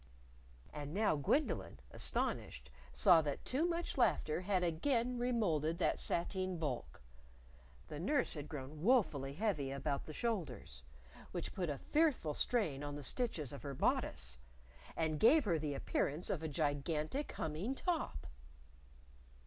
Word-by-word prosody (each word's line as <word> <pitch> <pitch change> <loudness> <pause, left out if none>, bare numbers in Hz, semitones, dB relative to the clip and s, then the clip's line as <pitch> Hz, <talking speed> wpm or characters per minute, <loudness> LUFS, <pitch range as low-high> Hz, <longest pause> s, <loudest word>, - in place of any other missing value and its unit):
And 150 +2 -5
now 210 -5 +3
Gwendolyn, 150 - 0
astonished, 65 0 -2 0.2
saw 65 - +6
that 145 -2 -3
too 295 +7 +1
much 340 -4 -2
laughter 165 -8 +2
had 185 -1 +1
again 235 - +1
remolded 175 - +1
that 180 - +1
sateen 185 +1 -1
bulk. 125 - -4 0.8
The 150 - -6
nurse 275 - +1
had 150 -2 -6
grown 145 +1 -7
woefully 170 - +3
heavy 170 -8 0
about 140 +1 -2
the 155 - -6
shoulders 145 - -3 0.5
which - - -4
put 180 -4 -2
a 145 - -2
fearful 290 - +1
strain 165 - +1
on 145 0 -4
the 145 - -6
stitches 160 - 0
of 140 - -7
her 140 -1 -5
bodice! - - 0 0.6
and 155 -2 0
gave 285 +5 +6
her 170 -5 +2
the 145 -2 -2
appearance 150 +4 -1
of 165 - -1
a 160 - -2
gigantic 150 - -1
humming 160 - -2
top! 320 - -2
160 Hz, 140 wpm, -37 LUFS, 145-225 Hz, 0.8 s, saw